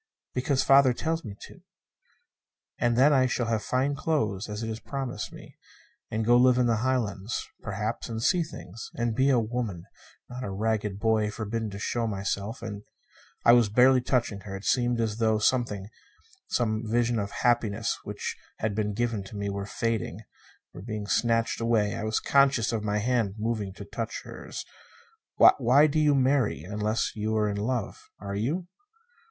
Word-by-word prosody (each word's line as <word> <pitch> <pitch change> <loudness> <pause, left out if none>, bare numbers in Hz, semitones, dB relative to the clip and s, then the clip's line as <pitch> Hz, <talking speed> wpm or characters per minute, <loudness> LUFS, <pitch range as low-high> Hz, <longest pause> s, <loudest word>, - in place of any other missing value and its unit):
"Because 130 +1 +1
father 135 -2 +6
tells 165 +5 -2
me 105 -3 -7
to. - - -12 1.2
And 120 -1 +2
then 140 +4 +6
I 130 -2 +4
shall 120 -1 -1
have 115 -1 0
fine 130 +6 0
clothes: 110 -10 -1
it 105 +2 -4
is 110 0 -4
promised 125 -6 -5
me. - - -13 0.5
And 110 0 -2
go 120 +1 +5
to - - +5
live 125 -1 +5
in 125 - +3
the 115 -2 +2
Highlands, 110 -4 -1
perhaps. 110 +3 -3
And 115 -1 -3
see 170 +10 +2
things; 115 - -8
and 120 -4 0
be 130 +5 +3
a 130 - +4
woman, 110 -6 -2 0.4
not 125 +1 -7
a 105 - -3
ragged 105 0 -1
boy 110 -1 +2
forbidden 110 +1 -3
to 100 - -7
show 115 +3 -1
myself; 100 +2 -3
and 105 -2 -5 0.3
" - - -29
I 115 - +8
was 120 -3 +5
barely 125 +4 +5
touching 120 -5 0
her. 95 -1 -7
It 95 - -8
seemed 120 -1 +2
as 110 -2 -1
though 110 -1 +2
something 105 -3 0 0.6
some 110 -3 0
vision 120 +1 +1
of 100 -1 -2
happiness 115 -3 0
which - - -4 0.2
had 110 -1 -1
been 105 -1 -1
given 115 -3 -1
me 100 -1 -3
were 100 0 -4
fading, 115 -3 -2 0.5
were - - -9
being 105 0 -5
snatched 115 +2 +1
away. 110 -3 +2
I - - -4
was 110 0 +1
conscious 135 -5 +3
of 110 -2 -2
my 105 0 0
hand 110 -3 0
moving 110 -3 -2
to 100 - -9
touch 115 +2 -5
hers. - - -8 0.7
"Why 135 +3 +6
do 155 0 +1
you 150 -2 +4
marry 130 - +2
unless 105 +4 -1
you're 110 0 0
in 100 -1 -2
love? 115 +1 -3
Are 100 -1 -6
you?" 145 - -2
115 Hz, 175 wpm, -27 LUFS, 105-125 Hz, 1.2 s, I